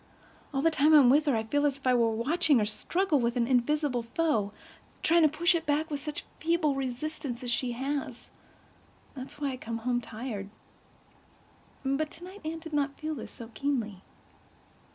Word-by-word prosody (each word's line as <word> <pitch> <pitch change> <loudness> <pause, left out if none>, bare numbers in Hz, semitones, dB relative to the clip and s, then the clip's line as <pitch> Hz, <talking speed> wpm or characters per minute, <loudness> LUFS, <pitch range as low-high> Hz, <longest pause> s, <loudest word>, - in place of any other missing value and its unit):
All 270 -1 -1
the 330 - +4
time 310 0 +5
I'm 265 -5 +8
with 300 +3 +4
her 275 - +3
I 220 - 0
feel 290 +6 0
as 285 -2 +1
if 275 - -19
I 255 - +4
were 235 -2 +4
watching 285 +7 +2
her 215 - +2
struggle 320 - +1
with 235 0 0
an 240 -1 +2
invisible 260 +1 +1
foe—trying 270 +4 -1
to 310 - +6
push 340 +4 +3
it 330 -2 -2
back 305 +2 +1
with 290 - -2
such 300 +1 -5
feeble 320 -3 +2
resistance 270 0 -4
as 245 - -1
she 245 0 0
has. 265 -1 -4 0.8
That 260 -1 -7
is - - -14
why 290 -1 -2
I 255 - -5
come 230 -2 -4
home 245 +1 0
tired." 220 -3 -6 1.4
But 275 +3 0
tonight 365 +6 -11
Anne 320 +1 -3
did 320 -1 -10
not 285 -1 0
feel 310 0 -3
this 265 - -7
so 230 0 -10
keenly. 235 -9 -2
275 Hz, 185 wpm, -29 LUFS, 240-310 Hz, 1.4 s, I'm